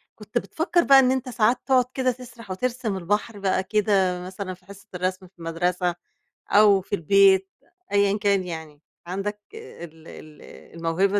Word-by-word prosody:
كنت - - -5
بتفكّر 345 +1 0
بقى 275 -3 +7
إن 255 -1 +4
أنت 260 -1 -2
ساعات 240 0 +2
تقعد 255 -2 +3
كده 255 -1 +1
تسرح 235 -4 -11
وترسم 235 0 -2
البحر 205 +4 -2
بقى 190 -1 0
كده، 190 -3 +1
مثلًا 185 0 -6
في 180 0 -18
حصة 200 +2 -14
الرسم 185 +1 -3
في 175 -2 -21
مدرسة 175 +1 -1 0.5
أو 205 -2 +5
في 205 - -3
البيت، 195 +2 +4 0.4
أيًا 200 0 +3
كان 200 -2 +2
يعني، 160 -4 -8 0.3
عندك 205 +3 -4
ال 170 - -11
ال 155 -1 -13 0.4
الموهبة 190 +5 +1
195 Hz, 155 wpm, -24 LUFS, 180-215 Hz, 0.5 s, بقى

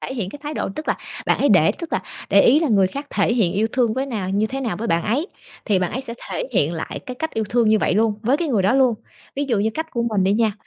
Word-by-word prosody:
thể 265 - -5
hiện 200 -7 -3
cái - - -9
thái 300 +1 -5
độ, - - -2
tức 310 - -6
là - - +1 0.3
bạn - - +2
ấy - - +3
để - - +5
tức 335 -2 -7
là - - 0 0.3
để 200 - +6
ý 280 +6 +5
là 320 - +1
người 195 -4 +4
khác 280 +9 -6
thể 205 +2 +1
hiện 210 -8 +2
yêu 210 +3 +1
thương 240 -4 +1
với 265 +2 -1
nào 205 -7 -3
như 205 +2 +1
thế 270 +4 -4
nào 230 -9 -2
với 225 +4 -4
bạn 165 -2 +1
ấy, 265 +11 0 0.4
thì 205 -4 +2
bạn 180 -1 -1
ấy 260 - -2
sẽ 235 -3 -6 0.2
thể - - -3
hiện 165 -7 +2
lại 165 -2 -5
cái 250 - -5
cách 320 +5 -3
yêu 220 - 0
thương 235 -1 +2
như 220 - +4
vậy - - +1
luôn 220 +1 +2
với 250 +5 +2
cái 335 0 -2
người 220 -8 +1
đó 200 +7 +3
luôn. 260 -3 +4 0.4
Ví 285 - 0
dụ 230 -5 +2
như 215 +2 +1
cách 320 0 -4
của 235 - -1
mình 215 -5 0
đi 195 - +3
nha, 220 0 +2
230 Hz, 315 wpm, -21 LUFS, 200-265 Hz, 0.4 s, để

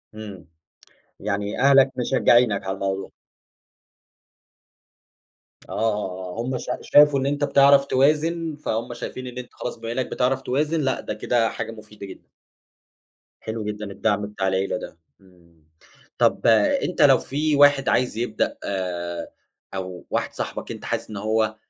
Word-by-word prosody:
إمم، 100 -6 -9 0.7
يعني 100 0 -3
أهلك 135 -1 +5
مشجعينك 120 -4 +3
على 95 0 -3
الموضوع. 95 0 -3 2.5
آه، - - -10
آه، 95 -4 -2
آه - - +1
هُم 125 +2 -2
شا 125 - -4
شافوا 145 -1 +5
إن 135 - -2
أنت 145 +1 -1
بتعرف 140 -1 +5
توازن، 155 +4 +1
فهُم 120 -5 -3
شايفين 130 +1 -7
إن 125 0 -9
أنت 125 -1 -8
خلاص 120 - -6
بما 115 0 -6
إنّك 125 +1 -1
بتعرف 130 +1 0
توازن 150 +5 0
لأ، 135 -2 0
ده - - -4
كده 115 +2 +1
حاجة 110 0 -5
مُفيدة 105 -2 -11
جدًا. 95 - -13 1.1
حلو 110 0 -5
جدًا 105 -1 -5
الدعم 105 0 0
بتاع 100 -2 -3
العيلة 95 +2 0
ده، 85 - -10 0.2
إمم، 85 -4 -24 0.5
طَب - - +2 0.4
أنت - - -1
لو - - +7
في 150 +2 -1
واحد 145 -1 +5
عايز 125 -3 +1
يبدأ 120 +1 -1
آآ 85 -3 -4 0.4
أو 95 -2 -6
واحد - - -2
صاحبك - - -5
أنت - - -8
حاسس - - -3
إن 105 - -6
هو 110 +1 0
110 Hz, 145 wpm, -23 LUFS, 100-135 Hz, 2.5 s, لو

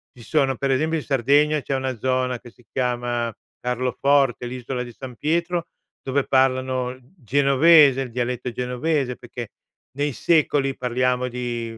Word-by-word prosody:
ci 120 - -13
sono, 135 0 +1
per 135 +2 -1
esempio 155 +5 +1
in - - -8
Sardegna 145 +3 +3
c'è 135 - -2
una 130 -2 -2
zona 130 +1 0
che 120 - -14
si 120 - -24
chiama 120 -2 -1 0.3
Carloforte, 125 +1 +1
l'isola 125 +1 -4
di 120 -1 -10
San 125 +1 -9
Pietro, 170 +4 -1 0.4
dove 135 +1 0
parlano 130 -1 +1 0.2
genovese, 140 +1 +5
il 130 -3 -5
dialetto 125 +1 -2
genovese; 125 +2 -1
perché 120 0 -7 0.5
nei 145 0 0
secoli, 145 -3 +1
parliamo 125 0 0
di 120 -2 -4
130 Hz, 145 wpm, -23 LUFS, 125-140 Hz, 0.5 s, genovese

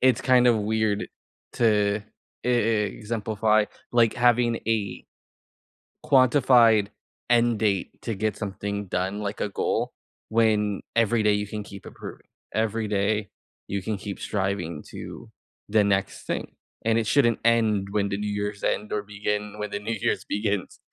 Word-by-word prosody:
it's 130 -2 +4
kind 125 -1 +4
of 120 -2 +5
weird 105 0 0 0.5
to 105 -2 +2 0.4
e - - 0
e - - +4 0.5
exemplify, 110 -1 +1 0.3
like, 115 -2 +4
having 120 -1 +3
a 110 -3 -1 1.0
quantified 120 -5 +5 0.4
end 120 -1 +4
date 100 -4 -1
to 115 - -3
get 105 +1 -1
something 100 0 -4
done, 95 +3 -2
like 105 0 -4
a - - 0
goal, 100 - -1 0.4
when 110 -2 +2
every 115 0 +3
day 105 0 +4
you 105 0 0
can 105 +1 -5
keep 100 -1 -11
improving. - - -10 0.3
Every 110 0 0
day 105 0 0 0.4
you 100 -1 -2
can 105 +2 -2
keep 100 0 -7
striving 95 -6 -2
to - - -9 0.4
the 110 0 +4
next 100 -1 -1
thing. - - -3 0.3
And 115 0 +3
it 115 - 0
shouldn't 120 -5 +3
end 110 -4 +2
when 100 -1 0
the 100 - -2
New 105 0 -2
Year's 105 0 -3
end 105 - -1
or 105 - 0
begin 105 0 -3
when 105 -1 -4
the - - -2
New 110 +2 -3
Year's - - -1
begins. 105 -2 -2
105 Hz, 155 wpm, -25 LUFS, 100-115 Hz, 1.0 s, of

